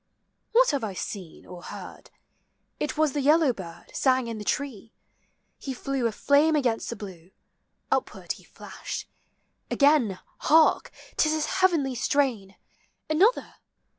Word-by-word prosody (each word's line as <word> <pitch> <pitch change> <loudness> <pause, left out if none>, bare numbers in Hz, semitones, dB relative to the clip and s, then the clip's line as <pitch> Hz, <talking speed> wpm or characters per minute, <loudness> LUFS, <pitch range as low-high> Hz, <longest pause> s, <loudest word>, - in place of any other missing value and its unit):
What - - +5
have 280 -4 -1
I 200 -3 -4
seen 185 -3 -7
or 180 -1 -10
heard? - - -10 0.7
it 300 - -2
was 310 -3 +2
the 290 - -1
yellow 300 -1 +4
bird 170 -5 -10
Sang 260 -2 +2
in 230 -2 -5
the - - -6
tree: 230 -4 -3 0.7
he 265 -2 -5
flew 270 -1 -1
a - - -2
flame 290 +7 +3
against 245 -6 0
the 235 - -4
blue; 185 -5 -10 0.6
Upward - - -1
he - - -6
flashed. - - -8 0.6
Again, 280 -9 +3 0.2
hark! 315 +1 +4 0.3
't - - +4
is 310 - +1
his 310 -1 0 0.2
heavenly 320 -8 +3
strain, 240 -6 0 0.6
Another 390 +11 +2
265 Hz, 140 wpm, -26 LUFS, 215-300 Hz, 0.7 s, What